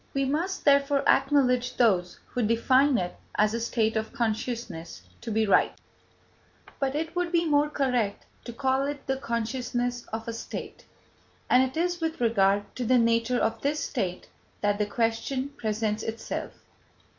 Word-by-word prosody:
We 275 0 +2
must, 335 +8 -2
therefore, 280 0 +4
acknowledge 255 -3 +3
those 185 -7 +2
who 250 - -2
define 255 +5 +3
it 180 -1 -3 0.2
as 210 +1 +3
a 230 - -1
state 225 -1 0
of 220 0 -2
consciousness 225 -7 -3 0.2
to 230 - -6
be 220 0 +2
right, 200 - +3 1.1
but 275 0 0
it 320 +2 -3
would 355 -1 -1
be 340 -1 +2
more 295 -1 +3
correct 250 -8 0 0.2
to 235 - -5
call 265 +2 +1
it 290 0 -5
the 265 - -1
consciousness 245 0 -2
of 225 +1 -5
a 230 - -3
state, 230 - -7 0.7
and 250 - +7
it 260 +2 -1
is 350 +1 0
with 320 0 -2
regard 205 -4 +2
to 250 - -2
the 250 +2 +4
nature 230 +1 +2
of 225 -1 0
this 295 +2 0
state 190 -13 -3 0.3
that 205 0 +1
the 210 - +1
question 235 +5 -1
presents 215 -4 -2
itself. 225 0 -4
245 Hz, 160 wpm, -27 LUFS, 225-275 Hz, 1.1 s, and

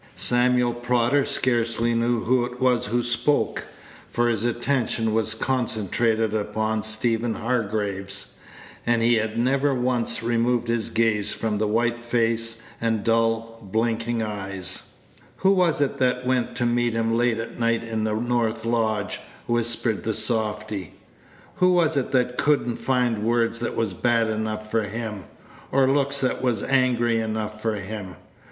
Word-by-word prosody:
Samuel 125 0 +4
Prodder 120 +3 +1
scarcely 120 -3 +1
knew 115 0 +1
who 125 +1 +2
it 125 0 -6
was 125 -2 +2
who 120 +3 0
spoke, 120 +5 0 0.4
for 120 0 +1
his 110 -2 -1
attention 120 -2 0
was 110 0 +1
concentrated 115 -2 0
upon 110 +1 -1
Stephen 115 +1 +1
Hargraves; 100 -4 -2 0.6
and 120 -1 +2
he 115 -1 +4
never 135 +3 +2
once 125 -2 0
removed 120 0 +1
his 115 -1 -1
gaze 110 -3 +1
from 110 -2 -2
the 110 - +1
white 120 +2 0
face, 115 -1 0 0.2
and 115 -2 0
dull, 115 0 0
blinking 115 +2 -1
eyes. 100 -3 -5 0.5
"Who 190 - +3
was 180 -6 +2
it 140 - 0
that 125 -1 +1
went 125 -1 0
to 120 - 0
meet 120 0 +1
him 115 0 0
late 120 -1 +2
at 115 +1 -6
night 115 0 +1
in 110 -1 -3
the 110 -1 0
north 115 -1 -1
lodge?" 110 -3 0 0.3
whispered 120 -2 0
the 110 -1 -1
softy. 105 - -1 0.6
"Who 180 0 +4
was 165 -3 +3
it 140 - -1
that 125 -1 +1
could 145 -3 +2
n't 120 - -3
find 125 -4 +1
words 115 0 +1
that 120 - -3
was 110 -5 -1
bad 115 +3 +1
enough 110 0 -3
for 115 - +2
him, 105 -1 -5 0.5
or 135 0 +4
looks 140 +1 +1
that 130 - 0
was 125 -3 0
angry 120 -3 +2
enough 110 -1 -3
for 110 -1 0
him? 100 -2 -6
115 Hz, 150 wpm, -24 LUFS, 110-120 Hz, 0.6 s, Samuel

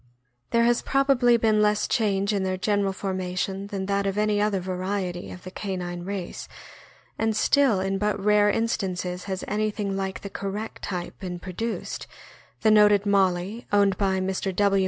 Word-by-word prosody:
There 235 0 +3
has 240 0 +3
probably 270 -3 +3
been 220 -2 +3
less 210 0 +2
change 200 -2 +1
in 200 - 0
their 185 0 -1
general 200 0 +1
formation 190 0 -3
than 195 -2 -4
that 200 0 0
of 195 +1 -2
any 210 -1 +2
other 205 -2 +1
variety 185 0 -3
of 180 - -10
the 185 - -8
canine 180 -3 -4
race, 195 -2 -5 0.7
and 225 -1 +1
still 265 -3 +3
in 195 +1 -1
but 210 0 0
rare 210 +1 +4
instances 185 -5 -1
has 190 -2 -4
anything 210 -1 -1
like 190 -1 -3
the 200 - -6
correct 200 +3 -5
type 180 -3 -5
been 180 -2 -5
produced, 195 +6 -5 0.5
the 220 - +4
noted 210 -1 +5
Molly, 195 +2 +1
owned 200 -1 +4
by 190 -2 +1
Mr. 190 0 -2
W. 200 0 +3
200 Hz, 165 wpm, -25 LUFS, 190-210 Hz, 0.7 s, noted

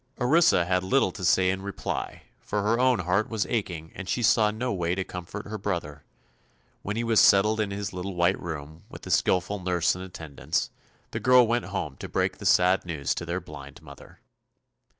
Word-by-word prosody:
Orissa 140 - +4
had 90 0 0
little 95 0 +2
to 90 - -9
say 90 +1 +3
in 95 0 -4
reply, 100 -1 -5 0.2
for 105 -1 -3
her 115 +3 +1
own 125 -5 +3
heart 90 +5 0
was 110 -3 -1
aching 85 -8 -3
and 100 -1 -8
she 120 - -1
saw 110 -1 +4
no 120 +4 -3
way 85 -2 -1
to 95 - -2
comfort 90 +3 -8
her 105 0 -6
brother. 85 -7 -4 0.8
When 100 - -4
he 115 - -1
was 115 -2 +3
settled 105 +3 +5
in 105 -2 0
his 100 0 -5
little 90 +1 -5
white 85 +2 +1
room, 80 -1 -7
with - - -11
a - - -5
skillful 95 +3 +1
nurse 90 -1 +1
in 90 - -8
attendance, 80 -5 -4 0.4
the - - -3
girl 125 -1 +6
went 120 +1 0
home - - -4
to - - -8
break - - -1
the - - -2
sad 90 +1 +4
news 80 -6 -2
to - - -6
their - - -2
blind - - -12
mother. - - -14
95 Hz, 200 wpm, -26 LUFS, 90-110 Hz, 0.8 s, girl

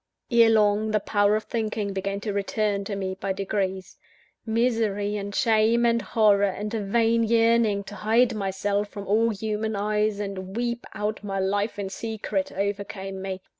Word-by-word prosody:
Erelong, 220 -2 +4
the 215 0 +2
power 205 0 +2
of 215 - -1
thinking 215 -3 -2
began 195 +1 -2
to 210 -1 -3
return 200 0 -1
to 200 - -3
me 190 -1 -3
by 195 +1 -3
degrees. 190 -1 -3 0.5
Misery, 220 -3 0
and 200 0 -5
shame, 225 +1 +3
and 235 0 +3
horror, 210 -1 +3
and 205 +2 -3
a 225 - -1
vain 230 +3 +2
yearning 225 -2 +3
to 200 - -10
hide 230 +4 +2
myself 200 0 -1
from 200 0 -8
all 220 +4 +3
human 215 0 -2
eyes, 210 0 0
and 195 0 -5
weep 240 0 -2
out 210 0 -3
my 195 -1 -3
life 200 +3 0
in 200 -1 -3
secret, 210 -2 -3
overcame 195 -1 -4
me. 190 -1 -5
210 Hz, 165 wpm, -25 LUFS, 200-220 Hz, 0.5 s, Erelong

